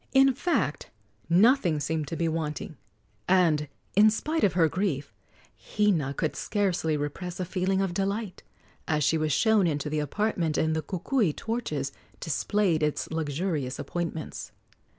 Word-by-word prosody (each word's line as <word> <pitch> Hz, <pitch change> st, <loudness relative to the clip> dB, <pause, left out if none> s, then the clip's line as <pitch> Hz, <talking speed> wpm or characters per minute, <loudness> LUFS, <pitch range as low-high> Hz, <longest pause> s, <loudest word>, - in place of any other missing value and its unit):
In 270 Hz, 0 st, +6 dB
fact, 245 Hz, -, -1 dB, 0.4 s
nothing 180 Hz, -, +4 dB
seemed 155 Hz, 0 st, -2 dB
to 165 Hz, -, -4 dB
be 165 Hz, 0 st, 0 dB
wanting, 155 Hz, -1 st, -3 dB, 0.5 s
and, 165 Hz, -5 st, +3 dB, 0.3 s
in 210 Hz, +2 st, +7 dB
spite 310 Hz, +9 st, -1 dB
of 200 Hz, -, +4 dB
her 170 Hz, -2 st, +4 dB
grief, 155 Hz, -5 st, -2 dB, 0.4 s
Hina 170 Hz, -10 st, 0 dB
could 155 Hz, -, -1 dB
scarcely 180 Hz, -7 st, 0 dB
repress 170 Hz, +5 st, -5 dB
a 185 Hz, -, -1 dB
feeling 190 Hz, +1 st, 0 dB
of 190 Hz, -2 st, -1 dB
delight 200 Hz, +2 st, -2 dB, 0.5 s
as 150 Hz, -3 st, +1 dB
she 160 Hz, +3 st, +2 dB
was 155 Hz, 0 st, 0 dB
shown 215 Hz, -, +3 dB
into 150 Hz, -1 st, -2 dB
the 155 Hz, -, 0 dB
apartment 165 Hz, -1 st, -1 dB
and 160 Hz, 0 st, +1 dB
the 160 Hz, -, 0 dB
kukui 190 Hz, -, 0 dB
torches 155 Hz, -, -3 dB, 0.3 s
displayed 175 Hz, +1 st, 0 dB
its 150 Hz, 0 st, -1 dB
luxurious 155 Hz, -3 st, -2 dB
appointments. 165 Hz, -2 st, -5 dB
170 Hz, 145 wpm, -27 LUFS, 155-205 Hz, 0.5 s, in